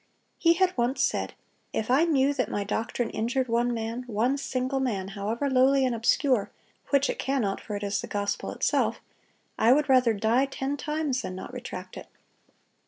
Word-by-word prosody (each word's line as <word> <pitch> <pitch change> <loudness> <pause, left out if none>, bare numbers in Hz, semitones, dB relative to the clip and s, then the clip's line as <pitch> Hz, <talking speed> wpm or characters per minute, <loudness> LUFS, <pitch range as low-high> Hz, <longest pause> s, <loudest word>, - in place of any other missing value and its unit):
He 335 0 +5
had 365 +1 +1
once 245 +3 +1
said, - - -1 0.4
"If 220 - -1
I 285 +6 +5
knew 285 -4 +2
that 255 -3 -1
my 205 - -2
doctrine 225 +3 -2
injured 245 +4 -1
one 240 +1 +1
man, 230 +1 -3
one 240 +4 +1
single 270 -1 -2
man, 205 -8 -2
however 215 +7 -2
lowly 265 +1 +4
and 250 - 0
obscure,—which 260 +3 0
it - - -3
cannot, 255 -8 -1
for 210 - -6
it 205 - -4
is 200 0 -1
the - - -7
gospel 205 0 -2
itself,—I 225 - -1
would 295 +3 +4
rather 255 -3 +5
die 230 +6 +2
ten 270 +1 -3
times 295 -2 -2
than 185 - -5
not 190 - -8
retract 185 -7 -7
it." - - -9
250 Hz, 170 wpm, -27 LUFS, 220-275 Hz, 0.4 s, He